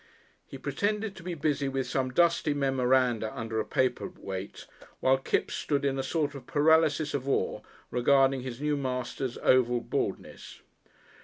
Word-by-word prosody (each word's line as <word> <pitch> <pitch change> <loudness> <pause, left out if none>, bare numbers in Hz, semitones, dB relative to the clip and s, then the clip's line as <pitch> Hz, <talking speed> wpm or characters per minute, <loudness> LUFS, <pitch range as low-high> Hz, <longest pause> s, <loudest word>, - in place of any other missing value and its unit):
He - - -8
pretended 210 0 -2
to 190 - -11
be 175 0 -4
busy 145 -3 0
with 135 -1 -2
some 130 -1 -1
dusty 165 +1 +2
memoranda 130 -4 +1
under 110 -1 -2
a - - +1
paper 130 -2 0
weight, 100 - -7 0.3
while 130 0 +3
Kipps - - -1
stood 140 -1 -1
in 135 -1 0
a - - +2
sort 145 +2 -1
of 140 - -10
paralysis 155 0 +3
of 140 -1 -2
awe - - 0 0.3
regarding 135 +2 +3
his 125 -1 -6
new 150 0 0
master's 130 -1 -3
oval 125 -1 +4
baldness. - - -4
135 Hz, 155 wpm, -29 LUFS, 125-150 Hz, 0.3 s, oval